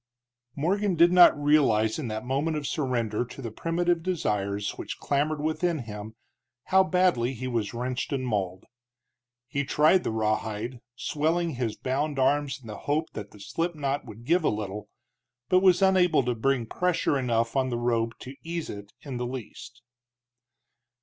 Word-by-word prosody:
Morgan 190 Hz, +6 st, +1 dB
did 170 Hz, +1 st, +6 dB
not 180 Hz, -4 st, +7 dB
realize 140 Hz, -6 st, +3 dB
in 140 Hz, -, -3 dB
that 110 Hz, +2 st, -4 dB
moment 145 Hz, +5 st, 0 dB
of 150 Hz, -, -4 dB
surrender 120 Hz, -7 st, -1 dB
to 125 Hz, -, -11 dB
the 115 Hz, -4 st, -5 dB
primitive 170 Hz, +5 st, 0 dB
desires 105 Hz, -, -1 dB
which -, -, -7 dB
clamored 145 Hz, +2 st, 0 dB
within 160 Hz, +3 st, 0 dB
him 110 Hz, -3 st, -7 dB, 0.5 s
how 190 Hz, 0 st, +4 dB
badly 180 Hz, -10 st, +2 dB
he 130 Hz, +2 st, -5 dB
was 115 Hz, -5 st, -1 dB
wrenched 125 Hz, +5 st, -3 dB
and 135 Hz, -2 st, -1 dB
mauled. 95 Hz, -5 st, -2 dB, 0.8 s
He 140 Hz, +3 st, -1 dB
tried 155 Hz, +6 st, +4 dB
the -, -, -1 dB
rawhide, 110 Hz, +2 st, -2 dB
swelling 165 Hz, +5 st, 0 dB
his 120 Hz, -5 st, -2 dB
bound 140 Hz, +4 st, -2 dB
arms 140 Hz, 0 st, +1 dB
in 130 Hz, -, -18 dB
the 105 Hz, -2 st, -7 dB
hope 155 Hz, +2 st, 0 dB
that 105 Hz, -2 st, -6 dB
the 105 Hz, -, -16 dB
slipknot 145 Hz, -, -2 dB
would 115 Hz, 0 st, -11 dB
give 170 Hz, +4 st, +3 dB
a -, -, +3 dB
little, 105 Hz, -1 st, -4 dB, 0.6 s
but 185 Hz, -, +5 dB
was 185 Hz, 0 st, +4 dB
unable 180 Hz, -6 st, +4 dB
to 125 Hz, 0 st, 0 dB
bring 125 Hz, +1 st, 0 dB
pressure 175 Hz, +4 st, 0 dB
enough 115 Hz, -2 st, 0 dB
on 130 Hz, -1 st, +2 dB
the 120 Hz, -, -2 dB
rope 115 Hz, -1 st, 0 dB
to 130 Hz, -, -8 dB
ease 165 Hz, 0 st, -4 dB
it 100 Hz, 0 st, -9 dB
in 135 Hz, -4 st, -5 dB
the 125 Hz, 0 st, -2 dB
least. 120 Hz, -1 st, -8 dB
130 Hz, 165 wpm, -27 LUFS, 115-160 Hz, 0.8 s, not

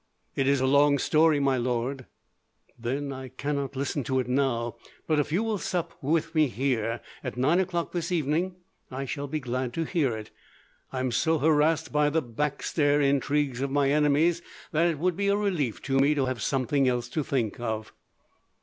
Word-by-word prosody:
"It 135 Hz, -, +1 dB
is 140 Hz, -1 st, +3 dB
a 130 Hz, -, +1 dB
long 140 Hz, +1 st, +4 dB
story, 155 Hz, +2 st, +3 dB
my 135 Hz, -2 st, +2 dB
lord." 125 Hz, +2 st, -2 dB, 0.7 s
"Then 135 Hz, +4 st, -3 dB
I 130 Hz, 0 st, -7 dB
cannot 140 Hz, +1 st, -3 dB
listen 140 Hz, +1 st, -2 dB
to 130 Hz, -1 st, +1 dB
it 125 Hz, -, -2 dB
now; 125 Hz, -3 st, 0 dB, 0.3 s
but 155 Hz, -2 st, +2 dB
if 150 Hz, -, -1 dB
you 185 Hz, +7 st, +1 dB
will 220 Hz, -3 st, -1 dB
sup 175 Hz, -2 st, -2 dB
with 160 Hz, +3 st, 0 dB
me 155 Hz, -2 st, +4 dB
here, 120 Hz, -3 st, -1 dB, 0.2 s
at -, -, -5 dB
nine 150 Hz, +8 st, +3 dB
o'clock 175 Hz, -2 st, -1 dB
this 175 Hz, 0 st, -3 dB
evening, 170 Hz, +3 st, 0 dB, 0.3 s
I 135 Hz, +1 st, -4 dB
shall 140 Hz, +1 st, -4 dB
be 155 Hz, +2 st, -2 dB
glad 125 Hz, -1 st, -3 dB
to 165 Hz, -, -1 dB
hear 145 Hz, -9 st, 0 dB
it. 110 Hz, -, -9 dB, 0.6 s
I 130 Hz, -, -2 dB
am 130 Hz, -1 st, -1 dB
so 160 Hz, +7 st, +2 dB
harassed 155 Hz, +1 st, +2 dB
by 150 Hz, 0 st, +3 dB
the 160 Hz, +1 st, 0 dB
backstair 145 Hz, +4 st, 0 dB
intrigues 140 Hz, -1 st, +1 dB
of 140 Hz, -, -1 dB
my 140 Hz, 0 st, +2 dB
enemies, 150 Hz, +3 st, +3 dB, 0.3 s
that 165 Hz, +2 st, +3 dB
it 165 Hz, -3 st, 0 dB
would 180 Hz, +3 st, 0 dB
be 200 Hz, +2 st, -1 dB
a 200 Hz, 0 st, +3 dB
relief 160 Hz, -, -1 dB
to 135 Hz, -1 st, +1 dB
me 145 Hz, +2 st, +4 dB
to 140 Hz, -2 st, +1 dB
have 130 Hz, -3 st, -3 dB
something 135 Hz, +3 st, +1 dB
else 120 Hz, -1 st, 0 dB
to 155 Hz, +3 st, -1 dB
think 120 Hz, -6 st, -1 dB
of." 110 Hz, -2 st, -4 dB
140 Hz, 195 wpm, -27 LUFS, 130-155 Hz, 0.7 s, long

